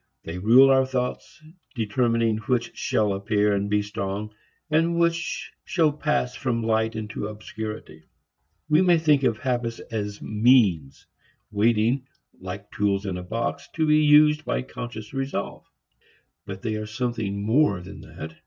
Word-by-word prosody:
They 85 +2 -6
rule 125 +7 +6
our 130 0 +4
thoughts, 125 +3 -4 0.3
determining 115 0 +1
which 125 -3 0
shall 105 -2 0
appear 105 +1 +1
and 100 0 -1
be 105 0 +1
strong 105 0 -4 0.3
and 165 +2 +1
which 170 0 -1
shall 160 -4 +2
pass 150 -4 -1
from 120 -4 -2
light 110 0 0
into 105 -1 -4
obscurity. 105 -6 -8 0.6
We 155 +3 +4
may 175 -2 +5
think 150 -3 +3
of 115 -5 +1
habits 120 -2 -2
as 105 -2 -4
means, 105 - +2 0.5
waiting, 115 +5 +1 0.3
like 95 +2 -8
tools 100 -1 0
in 95 -2 -3
a 90 - -5
box, 110 +6 -4
to 160 - +1
be 155 0 +4
used 150 +1 +5
by - - -2
conscious 120 -4 -8
resolve. 135 0 -4 0.8
But 95 -1 -7
they 110 -2 -2
are 110 0 -5
something 110 -3 -3
more 110 -4 +2
than 90 - -10
that. 80 0 -9
115 Hz, 145 wpm, -24 LUFS, 105-135 Hz, 0.8 s, rule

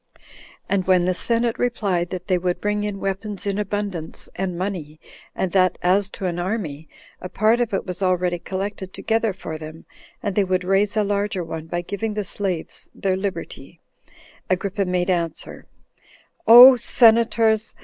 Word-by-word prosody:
And 190 -2 0
when 180 -2 +4
the 185 - +1
senate 230 +4 -1
replied 195 -8 0
that 180 -1 -6
they 185 -2 +1
would 180 0 -1
bring 210 0 -1
in 205 -1 -4
weapons 195 +1 -4
in 200 0 -1
abundance, 200 -5 -4
and 185 -2 -3
money, 170 -5 -5 0.4
and 190 - -2
that 185 -1 +2
as 190 +2 +2
to 195 - -4
an 175 -1 -2
army, 175 -6 -4 0.3
a 180 - -7
part 220 +4 +2
of 235 -2 -1
it 195 - -2
was 180 0 -6
already 180 -2 +1
collected 190 +1 -5
together 225 -1 0
for 165 -4 -7
them, 155 +1 -10 0.4
and 205 - -1
they 205 - +2
would 185 -1 0
raise 195 +3 +1
a 215 - +3
larger 200 -2 -1
one 160 -1 -7
by 175 +1 -2
giving 205 +4 -4
the 210 - -1
slaves 185 -4 -4
their 190 -1 0
liberty, 190 0 -6 0.7
Agrippa 195 +2 -1
made 180 0 0
answer, 170 -3 -3 0.8
"O 245 +3 +11
senators! 225 -2 +3
190 Hz, 165 wpm, -22 LUFS, 180-210 Hz, 0.8 s, O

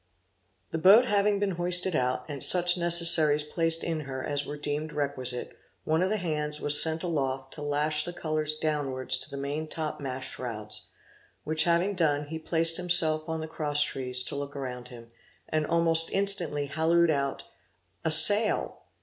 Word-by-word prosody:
The 165 - -4
boat 200 +8 +5
having 205 -2 0
been 195 -3 -4
hoisted 180 0 +1
out, 125 -1 -2
and 145 -3 -8
such 175 -1 +5
necessaries 170 -4 +4
placed 165 +2 -2
in 165 -2 -4
her 135 -3 -8
as 145 -1 -4
were 150 - -7
deemed 150 +1 -6
requisite, 130 -4 -5 0.3
one 160 +2 -1
of 185 - -1
the 215 - -2
hands 150 -4 -4
was 145 0 +4
sent 160 +1 -1
aloft 135 -6 -4
to 150 - -11
lash 150 +1 -1
the 175 - -6
colors 155 -3 -2
downwards 145 -4 -1
to 130 - -10
the 140 - -9
main 145 +3 -5
top 155 -1 -6
mast 130 -2 -6
shrouds; 110 -4 -5 0.5
which 155 0 -1
having 175 +4 0
done, 150 -5 -1
he 160 0 -7
placed 165 0 -1
himself 165 -3 +2
on 160 0 -4
the 160 - -7
crosstrees, 145 -5 -1
to - - -7
look 140 0 -7
around 125 -3 -8
him, 115 -2 -15 0.4
and 155 -1 -3
almost 165 -1 +2
instantly 180 -7 +6
hallooed 160 +3 0
out, 140 -2 -4 0.6
"A 160 - -1
sail." 205 +7 +5
155 Hz, 170 wpm, -26 LUFS, 145-170 Hz, 0.6 s, instantly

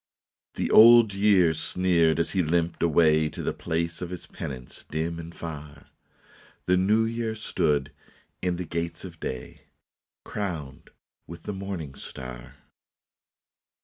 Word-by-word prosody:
" - - -68
The - - -2
Old 115 -1 +8
Year 100 -4 +4
sneered 85 -2 +1
as 85 - 0
he 95 - +1
limped 85 +1 0
away 80 -2 +4
To - - -7
the - - -1
place 85 +1 -3
of 90 - -4
his 90 -1 -7
penance 65 -3 -8
dim 80 +2 -2
and 85 0 -8
far. 75 -3 -9 0.7
The 90 - +3
New 105 +5 +3
Year 115 -1 -2
stood 75 -9 0 0.5
in 90 -1 0
the 90 +1 -4
gates 85 +1 -4
of 85 -3 -10
day, 65 -1 -6 0.6
Crowned 80 -7 -5 0.4
with 85 - -10
the 105 - -4
morning 95 -7 -5
star. 65 -3 -9
85 Hz, 140 wpm, -26 LUFS, 80-95 Hz, 0.7 s, Old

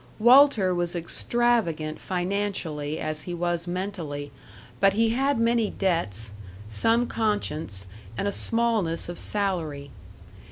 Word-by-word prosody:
Walter 240 -5 +6
was 175 0 -1
extravagant 170 -4 0
financially 180 -5 -2
as 155 0 -2
he 175 +4 -5
was 175 0 -1
mentally, 175 -6 -4 0.5
but 195 0 +5
he 225 +2 +3
had 270 +3 +1
many 230 -2 +2
debts, 115 - -1 0.4
some 225 - +2
conscience, 160 - -2 0.3
and 200 - -1
a - - +1
smallness 220 -9 0
of 175 - -6
salary. 165 -9 -2
180 Hz, 115 wpm, -26 LUFS, 155-225 Hz, 0.5 s, Walter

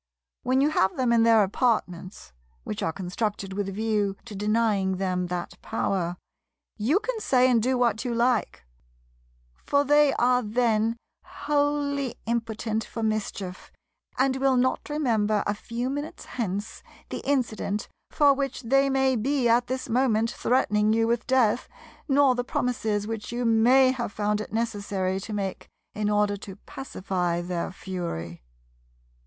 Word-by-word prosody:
When 260 +1 +2
you 295 +2 +3
have 190 -10 +1
them 250 -3 +2
in 230 - +4
their 225 -2 +6
apartments—which 170 - -3
are 165 - 0
constructed 195 +2 -3
with 200 0 -2
a - - -5
view 205 -1 -1
to 235 - -9
denying 210 -2 +1
them 180 -1 -1
that 175 0 -5
power—you 195 - -3
can - - -3
say 255 -10 +3
and 240 -3 +3
do 255 +3 +1
what 235 -3 +1
you 245 - -2
like; 235 - 0 0.9
for 285 - 0
they 295 0 +5
are 250 +1 +3
then 225 0 +1 0.3
wholly 285 -2 -1
impotent 225 -1 -2
for 225 - -6
mischief, 205 -4 -3 0.5
and 265 0 +2
will 265 -1 +2
not 255 +4 0
remember 220 -8 +1
a 205 - +1
few 235 +4 -4
minutes 290 +3 -5
hence 205 -3 -4 0.3
the - - -4
incident 235 -6 -1 0.2
for 290 -2 +4
which 275 -1 -3
they 275 +4 +3
may 265 -1 +2
be 255 +2 +1
at 240 +1 +3
this 260 +1 -3
moment 230 -2 +2
threatening 215 -4 +2
you 225 0 +2
with 235 +1 -1
death, 250 -3 +2 0.4
nor 275 -2 +4
the 245 0 -2
promises 220 -5 -1
which 225 0 -5
you 240 +1 -2
may 245 +4 +5
have 240 -5 -3
found 210 0 -1
it - - -8
necessary 200 -4 -1
to 205 +3 -8
make 200 -2 -4 0.3
in 210 0 -1
order 210 -1 +2
to 195 -1 -9
pacify 185 -7 -3
their 175 -1 -3
fury. 170 - -5
225 Hz, 150 wpm, -26 LUFS, 200-255 Hz, 0.9 s, their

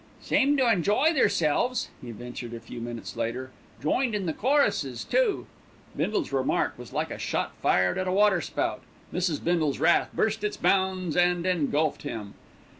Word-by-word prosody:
"Seemed 285 +1 +2
to 260 -2 +3
enjoy 225 - +3
theirselves," 245 - +1
he 125 - -8
ventured 120 +1 -7
a - - -6
few 115 +1 -9
minutes 120 0 -6
later. 130 +3 -3 0.3
"Joined 235 - +1
in 200 -2 -2
the 160 - -1
choruses 280 - +1
too." - - +1 0.5
Bindle's 360 -7 -1
remark 130 -1 +1
was - - -11
like - - -2
a - - -6
shot - - -2
fired 90 0 +2
at 185 - -1
a - - +1
waterspout, 190 -4 +1 0.3
Mrs. 175 -4 -1
Bindle's 160 -5 +1
wrath - - +3
burst 220 0 0
its 210 - -1
bounds 190 -4 +1
and 175 0 +2
engulfed 155 -4 +1
him. 110 -8 -6
175 Hz, 160 wpm, -27 LUFS, 135-210 Hz, 0.5 s, to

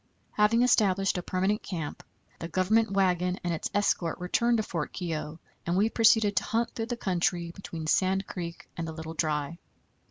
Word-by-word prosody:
Having 220 +3 +3
established 195 -6 +3
a - - -3
permanent 190 +4 0
camp, 165 -6 -5 0.4
the 165 - -4
Government 195 +6 +2
wagon 180 -2 +1
and 175 -1 -1
its 160 - -3
escort 185 -5 +1
returned 235 +7 +1
to 220 - 0
Fort 165 -7 -4
Keogh, 160 -3 -4 0.3
and 175 +2 +1
we 215 +3 +3
proceeded 220 -3 +4
to - - +3
hunt 230 +1 0
through 225 -1 -4
the 240 0 -3
country 175 -4 0
between 165 -3 -7
Sand 190 +4 +2
Creek 170 -2 -7
and 165 -1 -4
the 160 - -5
Little 160 0 -7
Dry. 155 0 -1
185 Hz, 180 wpm, -28 LUFS, 170-210 Hz, 0.4 s, proceeded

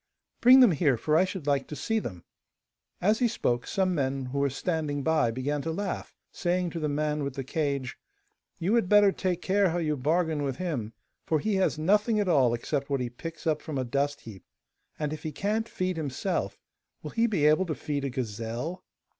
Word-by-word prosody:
'Bring 255 +2 +8
them 245 -6 +7
here, 145 -5 +2
for 155 +6 0
I 180 - +5
should 185 -5 -6
like 140 -2 +1
to 150 - -6
see 225 +8 0
them.' 90 - -7 0.8
As 210 +5 +3
he 245 - +4
spoke, 120 - -1
some 190 -2 +1
men 135 -3 -1
who 135 +2 -3
were 140 0 +2
standing 145 0 -2
by 160 -5 +2
began 135 +5 -2
to 160 - -3
laugh, 195 +3 -4 0.2
saying 180 0 -1
to 170 - -4
the 155 -1 -1
man 150 0 -1
with 140 -1 -4
the 135 - -3
cage: 140 -2 -2 0.6
'You 185 +5 0
had 230 -6 +2
better 205 -1 +6
take 180 -2 -2
care 195 0 +3
how 170 - -1
you 155 -3 0
bargain 155 +3 0
with 135 -3 -2
him, 130 -12 -3 0.3
for 155 - +2
he 210 +4 0
has 185 -4 +1
nothing 210 +7 +2
at 205 - 0
all 130 -8 +4
except 140 +4 -3
what 140 -1 0
he 125 -1 -3
picks 165 +6 -8
up 155 -2 +1
from 150 -3 -5
a 130 - 0
dust 140 +3 -1
heap, 100 -6 -11 0.5
and 150 -1 -2
if 155 - -6
he 155 - -4
can't 215 +8 -1
feed 185 -1 -2
himself, 155 +5 -2 0.5
will - - -6
he 230 0 +2
be 185 -10 +1
able 155 +5 +4
to 155 - -2
feed 145 -2 -3
a 140 - -1
gazelle? 120 - -4
155 Hz, 215 wpm, -28 LUFS, 140-185 Hz, 0.8 s, Bring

